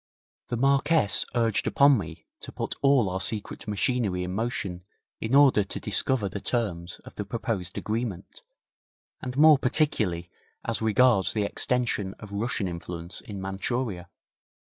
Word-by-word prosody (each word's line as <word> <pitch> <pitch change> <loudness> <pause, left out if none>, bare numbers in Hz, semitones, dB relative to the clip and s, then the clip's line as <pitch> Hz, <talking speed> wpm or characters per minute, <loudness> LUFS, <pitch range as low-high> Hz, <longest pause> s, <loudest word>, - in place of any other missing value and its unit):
The 120 - -2
Marquess 140 - +2
urged 115 -3 +1
upon 140 0 +5
me 90 - -8
to - - -9
put - - -3
all 140 -6 +4
our 95 0 -2
secret 105 0 -3
machinery 105 -3 0
in 90 0 -4
motion 100 -5 -3 0.4
in 115 +4 0
order 140 -7 +6
to 95 - -6
discover 125 -6 +1
the 100 +1 -6
terms 95 -8 -2
of - - -11
the 105 - -4
proposed 105 -4 -3
agreement, 110 - -4 0.8
and 125 0 -5
more 155 -1 +7
particularly 110 - +1 0.3
as 115 -1 -1
regards 110 -2 +3
the 105 - 0
extension 105 -3 0
of 105 -2 -12
Russian 105 -1 -1
influence 85 0 -6
in 100 -2 -8
Manchuria. 95 0 -3
110 Hz, 140 wpm, -26 LUFS, 95-125 Hz, 0.8 s, more